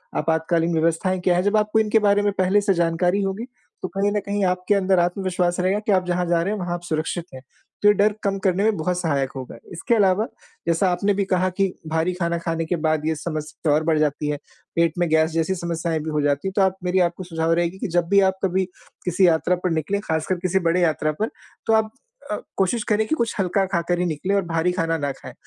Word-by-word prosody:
आपातकालीन 165 +2 +1
व्यवस्थाएँ 165 +3 +1
क्या 180 0 +2
हैं 180 - +1
जब 205 +2 +2
आपको 210 +1 +2
इनके 220 0 +3
बारे 205 -1 +3
में 205 0 +1
पहले 190 +2 +3
से 200 -1 +2
जानकारी 175 +3 +1
होगी 195 +4 -3 0.4
तो - - -2
कहीं 200 +2 0
न 210 - 0
कहीं 205 0 -1
आपके 180 +2 +1
अंदर 190 -1 +2
आत्मविश्वास 180 0 0
रहेगा 185 +3 +1
कि - - +1
आप 185 -2 +3
जहाँ 180 0 0
जा 170 -1 +2
रहे 195 +5 -1
हैं 215 - -4
वह 175 -1 -4
आप 175 - -4
सुरक्षित 165 +1 -2
हैं। 130 - -9 0.4
तो 205 - +4
ये 205 - +7
डर 205 +1 +3
कम 195 -1 0
करने 190 -1 +1
में 220 0 +3
बहुत 175 +3 -1
सहायक 140 -6 0
होगा। 130 -2 -7 0.2
इसके 175 +7 0
अलावा 200 0 +3 0.4
जैसा 170 +3 +2
आपने 200 +3 +1
भी 200 0 0
कहा 185 -1 +1
कि 195 -1 +3 0.2
भारी 160 +3 0
खाना 170 -1 -1
खाने 165 -1 -2
के 175 - -1
बाद 155 -1 +1
ये 160 0 +1
समस्या 155 0 -3
और 155 +1 +2
बढ़ 155 -1 +2
जाती 150 0 0
है। 150 - -1 0.4
पेट 170 -1 +2
में 175 0 +1
गैस 160 +1 +3
जैसी 165 +3 0
समस्याएँ 170 -2 -2
भी 155 +1 -5
हो 150 -1 0
जाती 145 +4 0
हैं 190 - -3
तो 200 - +3
आप 190 -1 +2
मेरी 180 +1 +1
आपको 175 +2 -9
सुझाव 165 -1 0
रहेगी 170 +2 0
कि 225 - -2
जब 175 -1 +2
भी 200 - +5
आप 190 - -5
कभी 190 0 +1 0.4
किसी 180 +1 +3
यात्रा 170 +2 +2
पर 180 - +1
निकले 165 +5 -1
ख़ासकर 160 -1 -1
किसी 185 +1 +2
बड़े 180 +2 +2
यात्रा 155 -2 +1
पर 220 - +1 0.4
तो 225 - +3
आप 220 0 +2 0.4
अ, - - +1 0.2
कोशिश 200 +4 +1
करें 215 0 +2
कि 315 - +1
कुछ 235 -5 -1
हल्का 195 +1 +1
खाकर 175 -2 -1
ही 180 - +1
निकलें 175 +4 -1
और 200 - +3
भारी 165 +1 0
खाना 165 -2 0
ना 145 -2 -2
खाएँ। - - -11
180 Hz, 245 wpm, -22 LUFS, 165-195 Hz, 0.4 s, ये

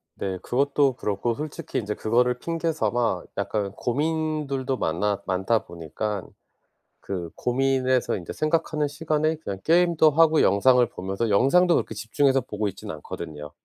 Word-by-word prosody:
네. 95 -1 -3
그것도 140 +1 +2
그렇고 105 +2 -2
솔직히 150 +2 -4
인제 105 -1 -3
그거를 125 +2 +1
핑계 165 +3 -2
삼아 115 - 0
약간 100 0 -2
고민들도 145 +1 -1
많아 100 +4 -1
많다 95 +5 0
보니깐 85 +5 -5 0.7
그 90 -4 -5
고민에서 130 -1 +1
인제 85 - -7
생각하는 155 -1 0
시간에 155 +1 0
그냥 100 -10 -6
게임도 170 -2 +4
하고 160 +1 +4
영상을 125 +5 +5
보면서 95 +2 -3
영상도 170 - +4
그렇게 110 - -1
집중해서 130 +6 +1
보고 105 -1 -3
있진 95 - -6
않거든요. 75 -1 -8
125 Hz, 340 characters per minute, -25 LUFS, 100-150 Hz, 0.7 s, 영상을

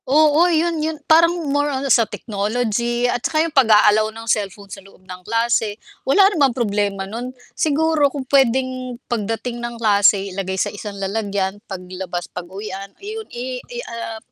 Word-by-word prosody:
Oo 310 +4 +5
'yun 330 -1 +1
'yun, 315 0 -2
parang 330 +1 +6 0.2
more 290 0 +1
on 270 -1 -2
sa 230 -3 +3
technology 235 +3 -1
at 245 -1 0
saka 310 +4 +1
'yung 330 - -5
pag-a-allow 215 -4 +5
ng 225 +1 -10
cellphone 205 -2 -1
sa 195 0 -10
loob 195 -1 -20
ng 185 -1 -9
klase, 230 0 0 0.2
wala 385 +9 +4
namang 275 -7 +2
problema 205 -4 -1
nun. 230 +5 -5 0.2
Siguro 310 -1 +2
kung 275 -1 -6
puwedeng 255 -1 +1
pagdating 235 +1 -3
ng 240 0 -5
klase 200 -3 +3
ilagay 190 0 -3
sa - - -1
isang 205 0 -7
lalagyan, 200 0 -2
paglabas 180 -2 -5
pag-uwian, 195 +2 -7
'yun 435 +2 -7
i 250 +1 -5
i 485 - -10
i - - -3
ah, 230 -1 -5
230 Hz, 165 wpm, -20 LUFS, 200-270 Hz, 0.2 s, parang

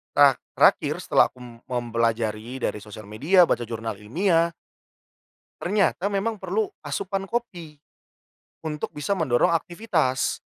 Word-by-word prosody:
terak - - +6 0.2
terakhir - - +4
setelah - - +4
aku 130 - -21
m 120 -1 -12
mempelajari 115 0 -1
dari - - -1
sosial 105 +1 -10
media, 145 - +4
baca 120 -8 0
jurnal 115 -2 -5
ilmiah 165 - +1 1.1
ternyata 195 0 +1
memang 205 +1 -2
perlu 195 +4 0 0.2
asupan 195 0 -3
kopi 175 -11 -4 0.8
untuk 155 -2 -4
bisa 150 +7 -2
mendorong 130 -9 +2
aktivitas. 160 - -1
150 Hz, 120 wpm, -24 LUFS, 115-190 Hz, 1.1 s, terak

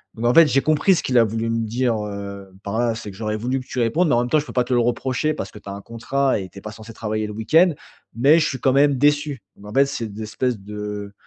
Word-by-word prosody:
Donc 115 - -4
en 120 - +4
fait, 165 -1 +8
j'ai 135 0 +2
compris 155 +5 +3
ce - - -2
qu'il 125 -1 +1
a 115 - +6
voulu 115 +1 -2
me 115 0 0
dire, 120 +1 0
heu, 100 -1 -7
par 100 +3 -3
là. 120 -2 +1
«C'est 105 -2 -7
que 95 - -14
j'aurais 110 -1 -2
voulu 125 +4 -1
que - - -13
tu 125 - -4
répondes, 140 +10 +2
mais - - +3
en 120 - +3
même 125 - -2
temps, 155 - +3
je 150 - -5
peux - - -9
pas 125 - +2
te 125 - -2
le 120 - +3
reprocher 130 +5 0
parce 95 - -6
que 105 - -11
tu - - -18
as 100 - -5
un 100 - -8
contrat 130 +3 -1
et 95 - -6
tu 100 - -12
es - - -16
pas 105 - -7
censé 110 +1 -11
travailler 110 -1 -3
le 105 - -7
week-end, 160 - +3 0.4
mais 145 +7 +5
je 150 - +2
suis 130 - -4
quand 130 - +2
même 140 0 +4
déçu». 145 -3 +1
Donc 105 - -13
en - - -9
fait, 140 +1 +5
c'est 115 -5 -4
d'espèce 110 +2 -3
de, 105 0 -6
115 Hz, 305 wpm, -22 LUFS, 105-135 Hz, 0.4 s, fait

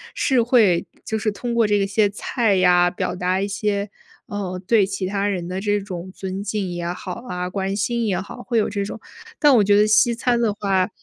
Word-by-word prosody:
是 260 -3 +2
会 220 -8 +3 0.2
就 220 - -2
是 215 - 0
通 235 +4 -4
过 230 -2 +3
这 205 0 +2
个 200 - +1
些 200 +1 +2
菜 210 +1 0
呀 180 -1 +4
表 180 - -3
达 185 +1 -1
一 200 - -1
些， 200 0 -1 0.4
呃， 195 -3 -4
对 215 -1 +4
其 195 0 -4
他 200 +1 -1
人 185 -4 -2
的 185 +1 -3
这 205 0 0
种 185 -2 -7
尊 190 0 -5
敬 200 -2 -3
也 175 -1 -4
好 180 +1 -5
啊， 180 -3 -3
关 195 +1 -2
心 235 +3 -1
也 195 -4 0
好， 245 - -9
会 235 - -1
有 215 - +2
这 200 -1 -2
种。 205 - -6 0.4
但 295 -2 +6
我 235 - +6
觉 205 0 +4
得 210 +1 +5
西 215 +2 +4
餐 240 0 +1
的 225 -3 +1
话， 195 -3 0
200 Hz, 240 characters per minute, -22 LUFS, 185-215 Hz, 0.4 s, 但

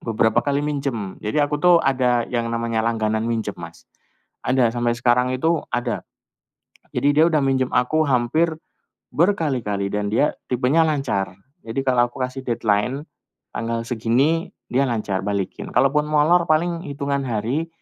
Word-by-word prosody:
beberapa 110 0 +1
kali 140 +3 -1
minjem. 135 -9 -3
Jadi 105 +7 -3
aku 145 0 -2
tuh 180 -1 +6
ada 125 -3 +2
yang 120 -1 -1
namanya 115 -1 -1
langganan 110 -1 0
minjem, 115 -2 -2
Mas. - - -10 0.6
Ada 125 -2 +3
sampai 120 -1 0
sekarang 125 +1 +2
itu, 160 +5 +1
ada. 120 -1 -2 0.9
Jadi, 145 0 +2
dia 155 - +6
udah 155 - +3
minjem 130 -1 +1
aku 140 +6 +2
hampir 155 +7 +1 0.6
berkali-kali 130 - 0
dan 105 0 -1
dia 145 +6 +3 0.2
tipenya 130 +6 +3
lancar. 120 - -1 0.3
Jadi, 115 +4 -2
kalau 120 -2 +3
aku 130 +1 -5
kasih 130 +1 -4
deadline 115 +4 0 0.5
tanggal 115 0 -2
segini, 130 - +1 0.2
dia 135 +2 +2
lancar 105 -5 -1
balikin. 100 -2 -3
Kalaupun 150 +2 +3
molor 155 +3 +3
paling 170 +2 +1
hitungan 140 0 -2
hari 120 +8 -1
125 Hz, 145 wpm, -22 LUFS, 115-145 Hz, 0.9 s, tuh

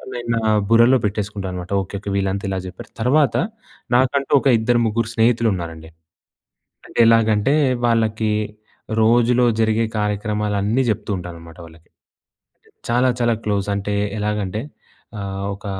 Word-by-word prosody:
నేను 120 -1 -6
నా - - -1 0.3
బుర్రలో 115 +3 +5
పెట్టేసుకుంటా 100 -1 -3
అనమాట. 90 +1 -7
ఓకే, 95 +1 -8
ఓకే, 100 - -6
వీళ్ళంతా 100 0 -1
ఇలా 95 -1 -2
చెప్పారు. 90 - -10
తర్వాత 140 +4 +3 0.6
నాకంటూ 130 +2 +1
ఒక - - 0
ఇద్దరు 120 +1 +2
ముగ్గురు 110 +1 -1
స్నేహితులు 115 0 +3
ఉన్నారండి. 80 -3 -7 1.0
అంటే - - -7
ఎలాగంటే 115 +2 +3 0.3
వాళ్ళకి 110 -2 +1 0.7
రోజులో 120 +2 +4
జరిగే 110 +1 +2
కార్యక్రమాలు 105 0 -1
అన్నీ 110 +6 +1
చెప్తూ 105 0 -4
ఉంటాననమాట 85 -1 -10
వాళ్ళకి. 80 0 -18 1.0
చాలా 125 +2 +3
చాలా 120 -1 +2
క్లోజ్ 100 -1 -1
అంటే 100 +1 -3 0.3
ఎలాగంటే 105 0 -2 0.6
ఆహ్, 95 0 -5
ఒక 100 - -12
105 Hz, 130 wpm, -20 LUFS, 100-115 Hz, 1.0 s, బుర్రలో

